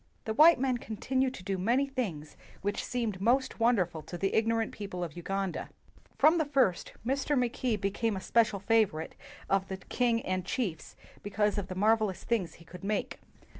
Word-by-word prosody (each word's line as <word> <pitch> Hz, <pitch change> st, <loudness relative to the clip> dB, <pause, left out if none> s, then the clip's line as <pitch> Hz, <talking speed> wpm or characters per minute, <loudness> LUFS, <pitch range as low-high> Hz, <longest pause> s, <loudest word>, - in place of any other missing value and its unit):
The 220 Hz, -, -1 dB
white 315 Hz, +6 st, +7 dB
men 255 Hz, -2 st, +1 dB
continued 260 Hz, +5 st, -1 dB
to 185 Hz, -, -10 dB
do 190 Hz, 0 st, -2 dB
many 240 Hz, +9 st, +2 dB
things 205 Hz, -, -4 dB, 0.3 s
which 205 Hz, +1 st, -1 dB
seemed 225 Hz, -6 st, -2 dB
most 255 Hz, +5 st, +1 dB
wonderful 190 Hz, -9 st, +2 dB
to 170 Hz, +3 st, -8 dB
the 195 Hz, +2 st, -1 dB
ignorant 225 Hz, 0 st, +1 dB
people 195 Hz, -4 st, -5 dB
of 165 Hz, -4 st, -6 dB
Uganda. 195 Hz, +2 st, -3 dB, 0.5 s
From 315 Hz, +4 st, +5 dB
the 315 Hz, -, +2 dB
first, 265 Hz, -, +1 dB
Mackay 255 Hz, -3 st, 0 dB
became 205 Hz, +2 st, -1 dB
a -, -, -5 dB
special 220 Hz, -2 st, +2 dB
favorite 195 Hz, -6 st, +1 dB, 0.3 s
of 195 Hz, 0 st, +1 dB
the 190 Hz, -, -4 dB
king 230 Hz, +4 st, 0 dB
and 185 Hz, 0 st, -1 dB
chiefs 180 Hz, -, -3 dB, 0.3 s
because 205 Hz, +1 st, 0 dB
of 190 Hz, -, -4 dB
the 185 Hz, -, -6 dB
marvelous 215 Hz, -1 st, +2 dB
things 190 Hz, -9 st, -1 dB
he 170 Hz, -, -17 dB
could 180 Hz, +3 st, -12 dB
make. 210 Hz, +1 st, -2 dB
215 Hz, 170 wpm, -30 LUFS, 190-245 Hz, 0.5 s, white